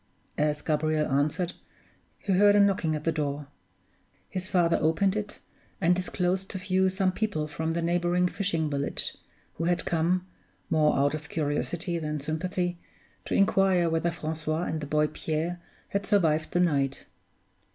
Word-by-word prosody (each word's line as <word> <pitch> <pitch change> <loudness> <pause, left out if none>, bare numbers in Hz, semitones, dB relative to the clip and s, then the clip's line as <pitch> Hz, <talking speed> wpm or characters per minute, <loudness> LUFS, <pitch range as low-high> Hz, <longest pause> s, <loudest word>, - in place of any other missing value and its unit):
As 150 0 +1
Gabriel 155 0 +1
answered 155 +6 +1 0.6
he 195 - -1
heard 205 +2 +6
a - - +6
knocking 190 -6 +3
at 150 - -4
the 165 - +2
door. 145 -2 -2 0.8
His 185 0 -4
father 175 -3 +2
opened 175 +6 +2
it, 210 -1 -4 0.4
and 175 +2 +4
disclosed 185 +1 -1
to - - -4
view 190 0 +2
some 190 0 +1
people 185 -7 -2
from 160 +2 -2
the 170 0 -1
neighboring 175 +1 +2
fishing 175 -5 -1
village, 140 -1 -2 0.4
who 165 - -1
had 175 0 +1
come 175 +2 +1 0.5
more 155 -1 +3
out 140 +1 +2
of 150 -1 -6
curiosity 165 +3 -1
than 150 -1 -3
sympathy 175 +4 -2 0.5
to - - -1
inquire 195 -4 +3
whether 165 +1 +1
Francois 160 0 -3
and 160 -3 -2
the 145 - -5
boy 150 +1 +2
Pierre 160 +3 -3 0.3
had 200 0 -2
survived 160 -7 +2
the 175 - 0
night. 140 -6 +1
170 Hz, 155 wpm, -28 LUFS, 155-185 Hz, 0.8 s, heard